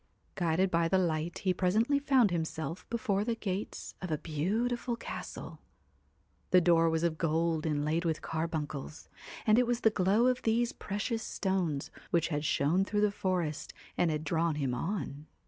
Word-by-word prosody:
Guided 180 +1 +1
by 170 0 +2
the 190 - +3
light 165 -2 0
he 190 -3 +1
presently 215 +10 +2
found 265 -7 +4
himself 160 +1 -3
before 210 -4 0
the 230 +1 -1
gates 200 -2 -4
of 185 - -4
a 155 - 0
beautiful 225 - -1
castle. 230 - -7 0.9
The 185 - +7
door 165 -1 +4
was 160 0 0
of 165 -2 0
gold 165 0 +1
inlaid 155 +2 0
with 160 -2 -1
carbuncles, 155 -2 -4 0.4
and 215 +2 +5
it 250 - +2
was 245 0 0
the 220 - +5
glow 205 +4 +3
of 250 0 +2
these 230 +2 +1
precious 215 +3 -3
stones 185 -10 -1 0.2
which 170 -1 +1
had 150 -2 -1
shone 155 +5 +2
through 205 +1 0
the 210 -1 +3
forest 180 -6 -2 0.2
and 175 - +2
had 155 -1 -1
drawn 165 -1 +1
him 135 -4 -1
on. 150 -1 -4
175 Hz, 165 wpm, -31 LUFS, 160-210 Hz, 0.9 s, The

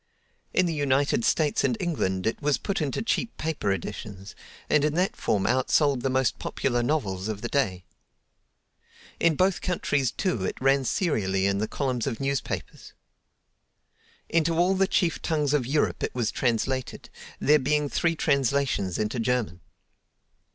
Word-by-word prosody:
In 185 - +3
the 170 - -1
United 140 -4 +1
States 150 +3 +2
and 235 - +1
England 95 - -1
it 110 - -1
was 145 -1 +2
put 200 -4 -2
into 150 - -2
cheap 230 0 -1
paper 155 -10 -1
editions, 100 0 -6 0.3
and 150 -1 +3
in 150 0 +1
that 190 +7 +1
form 100 - 0
outsold 130 +3 +2
the 135 - 0
most 130 -1 +1
popular 120 -2 -1
novels 110 -9 -1
of 105 -2 -4
the - - -1
day. 95 -10 -1 1.3
In 165 -2 +3
both 185 +3 +2
countries, 145 -7 0
too, 180 - -1
it - - -3
ran 135 0 +3
serially 100 - 0
in 100 0 +1
the 110 - -1
columns 130 -2 -2
of 120 -5 -3
newspapers. 135 -1 -4 1.3
Into 165 0 +1
all 180 +3 +3
the 195 0 +2
chief 170 -3 +1
tongues 150 -3 0
of 135 -5 +1
Europe 145 +3 0
it - - -3
was 120 -4 0
translated, 130 +1 -2 0.3
there 150 +2 +4
being 150 +2 +1
three 165 +3 0
translations 140 - +1
into 110 +3 -2
German. 115 -7 -1
135 Hz, 155 wpm, -26 LUFS, 115-155 Hz, 1.3 s, there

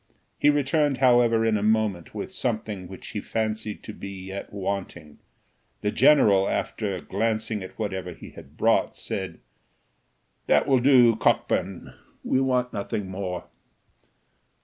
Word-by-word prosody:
He 145 - +5
returned 145 0 +2
however 120 -3 +4
in 110 -1 +2
a - - -2
moment, 105 -5 0
with - - -5
something 110 -6 -3
which 95 +1 -10
he 105 - -4
fancied 110 -1 -3
to 110 - -8
be 100 - -8
yet 95 0 -7
wanting; 95 -6 -5 0.6
the 105 - 0
general, 105 -11 +5
after 100 -4 -2
glancing 110 +1 -1
at 95 - -9
whatever 95 -4 -3
he - - -11
had - - -14
brought, - - +2
said, 95 -4 -5 1.1
"That 75 - +3
will 135 -2 +4
do, 120 -3 +6
Cockburn; 95 -3 0 0.3
we 130 - +1
want 125 -2 0
nothing 100 -2 -4
more." 95 -2 -4
105 Hz, 135 wpm, -25 LUFS, 95-120 Hz, 1.1 s, do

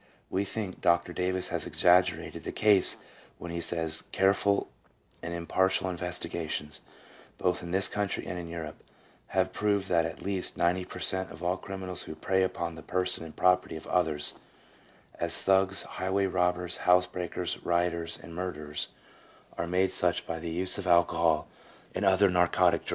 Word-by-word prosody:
3 - - -30 0.2
We 95 - +1
think 100 -2 -4
Dr. 85 0 +2
Davis 90 +1 -1
has - - -2
exaggerated 90 -2 +2
the - - -4
case 105 -3 +4 0.4
when 85 - -7
he 85 0 -3
says, 80 -2 0
" - - -31
Careful 100 +1 +2 0.5
and 85 - -5
impartial 95 +2 +1
investigations, 85 -3 -3 0.6
both 90 -1 0
in 85 - -7
this 95 +1 +3
country 105 0 -2
and 90 - -4
in 85 - -6
Europe, 80 -3 -7 0.4
have - - 0
proved 100 -2 +1
that 85 -2 +3
at 80 - -9
least 95 -1 -2
90 90 +2 +2
per 90 - -9
cent, 95 0 -2
of 80 - -11 0.2
criminals 95 -2 -4
who 80 - -7
prey 95 +4 +1
upon 85 -2 -1
the 80 - -10
person 90 -1 -1
and 80 -1 -10
property 90 -1 +3
of 80 - -7
others 80 -5 +2 0.4
— - - -26
as - - +3
thugs, 95 0 +3
highway 95 +1 -1
robbers, 90 -1 0
housebreakers, 90 -1 +1
rioters, 85 -1 0
and 85 - -10
murderers, 75 -4 -4 0.7
are 85 - -2
made 90 +2 +2
such 90 -1 +1
by 80 0 -4
the 85 +1 -5
use 90 +4 -1
of 95 - -4
alcohol 85 -2 +3 0.5
and - - -2
other 95 +1 +5
narcotic 90 -1 +3
1 - - -19
A. - - -2
90 Hz, 170 wpm, -29 LUFS, 85-95 Hz, 0.7 s, other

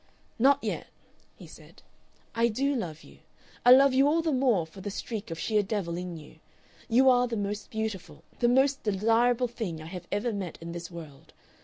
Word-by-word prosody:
"Not 275 +3 +4
yet," - - -3 0.5
he - - -13
said. - - -16 0.5
"I 230 0 +2
do 275 +5 0
love 170 - -4
you. - - -17 0.4
I - - +5
love 270 +1 +7
you 270 +2 +4
all 325 +3 +2
the 320 - 0
more 250 - +2
for 175 +4 -13
the 205 - -4
streak 215 +1 -5
of 165 - -5
sheer 210 +6 +1
devil 190 -4 -3
in 180 -1 -5
you.... 155 0 -14 0.5
You 255 +3 +4
are 250 -1 +5
the 230 -2 -3
most 205 +1 -4
beautiful, 190 -8 -5 0.2
the 240 - +3
most 270 +2 +3
desirable 230 +4 +2
thing 220 -9 -5
I 155 - -9
have 175 +1 -8
ever 220 +3 -1
met 190 -4 -5
in 165 0 -7
this 170 -1 -7
world. 160 -6 -12
215 Hz, 195 wpm, -28 LUFS, 175-245 Hz, 0.5 s, love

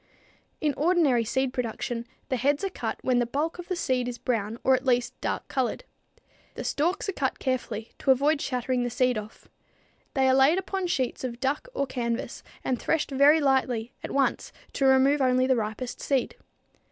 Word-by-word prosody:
In 300 -2 +1
ordinary 305 -7 +3
seed 260 +3 -1
production 235 0 -3 0.2
the 260 - +1
heads 280 +6 +1
are 390 - -1
cut - - -4
when 255 -1 +2
the 240 - +1
bulk 305 +7 -2
of 355 - -7
the 370 - -1
seed 255 -7 0
is 245 -1 -4
brown 225 -3 -2
or 265 - +4
at 255 0 +1
least 245 -2 +1
dark - - -2
colored. 260 - -1 0.7
The - - -5
stalks 350 +8 0
are - - +1
cut 270 -6 -1
carefully, 235 -4 -3
to - - -3
avoid 285 +3 +4
shattering 250 -1 -1
the 245 - -1
seed 250 +1 +1
off. 215 0 -8 0.7
They 265 -1 +3
are 260 - +5
laid 270 +6 +5
upon 380 -1 -2
sheets 260 -8 -1
of 240 -2 -4
duck 275 - -1
or 280 - +1
canvas 235 -3 -3 0.2
and 250 -2 -1
threshed 320 -2 0
very 285 +4 +6
lightly, 260 -5 +1
at - - -5
once, 275 -1 0 0.2
to 275 - 0
remove 270 +2 +5
only 255 0 +3
the 260 0 +3
ripest 220 +2 -4
seed. 270 -3 0
260 Hz, 190 wpm, -27 LUFS, 245-285 Hz, 0.7 s, very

